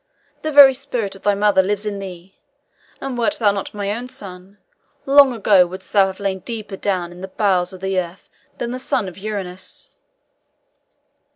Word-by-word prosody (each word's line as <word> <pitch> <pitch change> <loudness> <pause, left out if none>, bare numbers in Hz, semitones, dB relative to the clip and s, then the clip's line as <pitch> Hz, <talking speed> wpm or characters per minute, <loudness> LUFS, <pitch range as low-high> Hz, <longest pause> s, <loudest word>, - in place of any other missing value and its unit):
The 310 - -2
very 280 -2 +9
spirit 245 -7 -4
of 195 - -14
thy 205 -1 +2
mother 200 -1 +3
lives 205 +2 -2
in 205 -1 -3
thee, 185 -1 -10 0.6
and 270 -2 -4
wert 240 +5 +1
thou 210 -3 +3
not 200 -1 -4
my 205 +3 -3
son, 195 -5 -10 0.5
long 275 -1 +6
ago 200 -5 +4
wouldst 185 +1 -11
thou 195 -2 +5
have 190 0 -7
lain 195 -1 -2
deeper 215 -1 -6
down 185 -3 -2
in 175 +1 -12
the 190 - -5
bowels 185 -2 0
of 185 -1 -11
the 190 -1 0
earth 175 +1 -7 0.3
than 235 - -3
the 255 - -4
son 240 -5 -1
of 180 - -8
Uranus." 190 -3 -7
200 Hz, 180 wpm, -20 LUFS, 190-225 Hz, 0.6 s, very